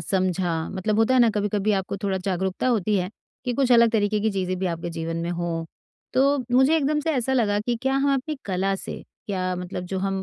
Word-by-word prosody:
समझा, 180 Hz, -3 st, 0 dB
मतलब 200 Hz, +3 st, -1 dB
होता 225 Hz, +3 st, +4 dB
है 255 Hz, -, +5 dB
ना, 235 Hz, -, +5 dB
कभी-कभी 210 Hz, 0 st, 0 dB
आपको 195 Hz, 0 st, -1 dB
थोड़ा 195 Hz, -2 st, 0 dB
जागरूकता 190 Hz, +2 st, -2 dB
होती 215 Hz, -3 st, +2 dB
है 180 Hz, +1 st, -2 dB, 0.3 s
कि, 250 Hz, -, 0 dB
कुछ 255 Hz, -1 st, +2 dB
अलग 235 Hz, -1 st, +6 dB
तरीके 210 Hz, -1 st, +1 dB
की 220 Hz, +1 st, +1 dB
चीज़ें 185 Hz, -2 st, -2 dB
भी 190 Hz, -, -1 dB
आपके 170 Hz, -1 st, -3 dB
जीवन 165 Hz, 0 st, -4 dB
में 170 Hz, +1 st, -2 dB
हों। 170 Hz, -1 st, -2 dB, 0.5 s
तो 275 Hz, +2 st, +3 dB
मुझे 265 Hz, +6 st, +5 dB
एकदम 300 Hz, 0 st, +1 dB
से 320 Hz, -, -1 dB
ऐसा 260 Hz, 0 st, 0 dB
लगा 215 Hz, -5 st, +2 dB
कि 235 Hz, +2 st, -1 dB
क्या 265 Hz, 0 st, +1 dB
हम 275 Hz, +1 st, +2 dB
अपनी 285 Hz, +3 st, -3 dB
कला 195 Hz, 0 st, 0 dB
से -, -, -7 dB, 0.2 s
क्या 185 Hz, -2 st, -1 dB
मतलब 180 Hz, 0 st, -5 dB
जो 190 Hz, -, 0 dB
हम 195 Hz, 0 st, -1 dB
200 Hz, 225 wpm, -24 LUFS, 185-245 Hz, 0.5 s, अलग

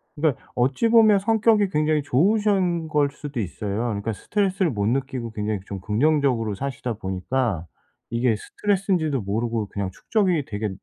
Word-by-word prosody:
그러니까 150 Hz, -4 st, 0 dB
어찌 130 Hz, -, +2 dB
보면 220 Hz, -3 st, +6 dB
성격이 215 Hz, -1 st, +3 dB
굉장히 150 Hz, -2 st, +1 dB
좋으신 185 Hz, -, +2 dB
걸 150 Hz, -2 st, +2 dB
수도 145 Hz, -4 st, -6 dB
있어요. 105 Hz, +4 st, -3 dB
그니까 105 Hz, +2 st, -3 dB
스트레스를 190 Hz, -, 0 dB
못 100 Hz, -3 st, -1 dB
느끼고 130 Hz, -2 st, -2 dB
굉장히 105 Hz, -1 st, -2 dB
좀 100 Hz, -1 st, -6 dB
긍정적으로 120 Hz, -, +1 dB
사시다 130 Hz, -1 st, -4 dB
보니까 95 Hz, -1 st, -2 dB, 0.5 s
이게 115 Hz, -1 st, +2 dB
스트레스인지도 180 Hz, -, -1 dB
모르고 110 Hz, +1 st, -2 dB
그냥 100 Hz, -2 st, -3 dB
축적이 180 Hz, -, 0 dB
되게 105 Hz, -1 st, -3 dB
135 Hz, 380 characters per minute, -24 LUFS, 110-180 Hz, 0.5 s, 보면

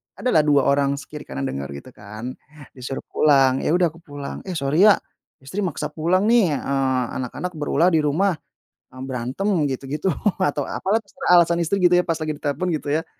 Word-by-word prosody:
ada 250 Hz, -, -1 dB
lah 155 Hz, -2 st, +3 dB
2 140 Hz, -2 st, +4 dB
orang 140 Hz, 0 st, +2 dB
se 140 Hz, -, -8 dB
kiri 150 Hz, -, -9 dB
kanan 70 Hz, 0 st, -5 dB
denger 70 Hz, +1 st, -3 dB
gitu 125 Hz, -, -11 dB
kan, 110 Hz, +5 st, -9 dB, 0.3 s
disuruh 135 Hz, +1 st, -6 dB
pulang, 135 Hz, -3 st, +4 dB
ya 160 Hz, -, +1 dB
udah 175 Hz, -3 st, +2 dB
aku 165 Hz, -, -17 dB
pulang, 145 Hz, -4 st, -8 dB
"Eh 180 Hz, -, -4 dB
sorry 155 Hz, +8 st, +3 dB
ya, 205 Hz, -, +7 dB, 0.5 s
istri 185 Hz, +10 st, -6 dB
maksa 155 Hz, -5 st, -2 dB
pulang 175 Hz, +5 st, +1 dB
nih, 215 Hz, -9 st, +3 dB
eee, 135 Hz, -2 st, 0 dB, 0.2 s
anak-anak 155 Hz, +8 st, -4 dB
berulah 160 Hz, +2 st, +1 dB
di 160 Hz, -, +3 dB
rumah, 160 Hz, +7 st, +2 dB, 0.6 s
mmm, 130 Hz, +1 st, -9 dB
berantem," 130 Hz, +8 st, -4 dB, 0.2 s
gitu 135 Hz, +1 st, -4 dB
gitu 150 Hz, +7 st, -2 dB, 0.3 s
atau 145 Hz, -5 st, 0 dB
apalah 205 Hz, +4 st, 0 dB, 0.4 s
alasan 170 Hz, 0 st, +3 dB
istri 185 Hz, +4 st, 0 dB
gitu 180 Hz, -, +5 dB
ya, 180 Hz, -, +5 dB
pas 165 Hz, -2 st, -2 dB
lagi 155 Hz, -1 st, -3 dB
ditelepon 145 Hz, +4 st, -3 dB
gitu 150 Hz, -2 st, -3 dB
ya, 165 Hz, -, -4 dB
150 Hz, 195 wpm, -22 LUFS, 135-175 Hz, 0.6 s, ya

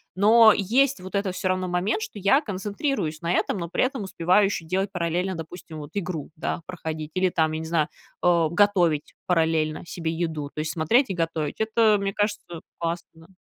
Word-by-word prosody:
Но 220 Hz, +3 st, +7 dB
есть 260 Hz, +7 st, +2 dB
вот 185 Hz, +2 st, -7 dB
этот, 200 Hz, -2 st, -1 dB
всё 190 Hz, -, -2 dB
равно, 185 Hz, 0 st, 0 dB
момент, 180 Hz, +5 st, 0 dB
что 210 Hz, -, -7 dB
я 200 Hz, +8 st, +4 dB
концентрируюсь 200 Hz, -, -3 dB
на 170 Hz, 0 st, -1 dB
этом, 200 Hz, -, 0 dB
но 170 Hz, -2 st, -4 dB
при -, -, +1 dB
этом 255 Hz, -3 st, -1 dB
успеваю 185 Hz, +2 st, +3 dB
ещё 195 Hz, -4 st, -2 dB
делать 190 Hz, +4 st, -1 dB
параллельно, 180 Hz, +1 st, -1 dB
допустим, 165 Hz, -1 st, -8 dB
вот 145 Hz, -1 st, -9 dB
игру, 180 Hz, -7 st, -4 dB
да, 170 Hz, -, -3 dB
проходить 160 Hz, -3 st, -5 dB
или 185 Hz, 0 st, +2 dB
там, 160 Hz, -2 st, +1 dB
я 155 Hz, -, -2 dB
не 160 Hz, -, -5 dB
знаю, 160 Hz, -2 st, +1 dB, 0.3 s
а, 170 Hz, -2 st, +3 dB
готовить 175 Hz, -4 st, +2 dB
параллельно 160 Hz, -3 st, +1 dB
себе 165 Hz, 0 st, -3 dB
еду, 160 Hz, -3 st, -3 dB
то -, -, -6 dB
есть 155 Hz, +1 st, -2 dB
смотреть 230 Hz, -, +2 dB
и -, -, -1 dB
готовить. 165 Hz, -3 st, -2 dB
Это, 220 Hz, -1 st, +3 dB
мне 195 Hz, 0 st, -2 dB
кажется, 205 Hz, -5 st, -2 dB, 0.2 s
классно, 170 Hz, 0 st, -3 dB, 0.2 s
да. 190 Hz, -, -24 dB
180 Hz, 195 wpm, -25 LUFS, 160-205 Hz, 0.3 s, Но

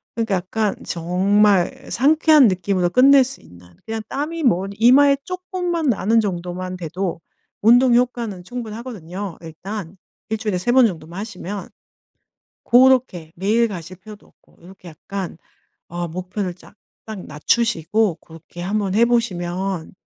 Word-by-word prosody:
그러니까 225 Hz, -4 st, 0 dB
약간 200 Hz, +3 st, -1 dB
정말 185 Hz, +2 st, +1 dB
상쾌한 305 Hz, +1 st, +5 dB
느낌으로 185 Hz, -1 st, 0 dB
끝낼 265 Hz, +6 st, +6 dB
수 265 Hz, +2 st, -8 dB
있는, 90 Hz, 0 st, -17 dB, 0.2 s
그냥 225 Hz, 0 st, -3 dB
땀이 315 Hz, +4 st, -3 dB
뭐 195 Hz, -7 st, +2 dB
이마에 270 Hz, +6 st, +5 dB
쪼끔만 360 Hz, -4 st, -3 dB
나는 225 Hz, 0 st, +2 dB
정도만 185 Hz, -2 st, -4 dB
돼도 175 Hz, +1 st, -4 dB, 0.4 s
운동 240 Hz, +2 st, +6 dB
효과는 235 Hz, -6 st, -1 dB
충분하거든요 210 Hz, -6 st, -7 dB
일단. 175 Hz, +3 st, -8 dB, 0.3 s
1 220 Hz, -, -1 dB
주일에 210 Hz, -4 st, -2 dB
3 215 Hz, +7 st, 0 dB
번 260 Hz, -2 st, +6 dB
정도만 170 Hz, 0 st, -7 dB
하시면. 200 Hz, -2 st, -7 dB, 1.0 s
고렇게 245 Hz, -10 st, +3 dB
매일 215 Hz, +6 st, +2 dB
가실 185 Hz, -3 st, -8 dB
필요도 210 Hz, +3 st, -14 dB
없고 -, -, -29 dB
요렇게 185 Hz, 0 st, -14 dB
약간 180 Hz, +2 st, -7 dB, 0.5 s
어 175 Hz, 0 st, -4 dB
목표를 185 Hz, +2 st, -4 dB
약간 200 Hz, +2 st, -13 dB
낮추시고 205 Hz, +4 st, 0 dB
고렇게 165 Hz, +2 st, -12 dB
한번 195 Hz, 0 st, -1 dB
해보시면 190 Hz, -6 st, 0 dB
200 Hz, 290 characters per minute, -20 LUFS, 180-235 Hz, 1.0 s, 끝낼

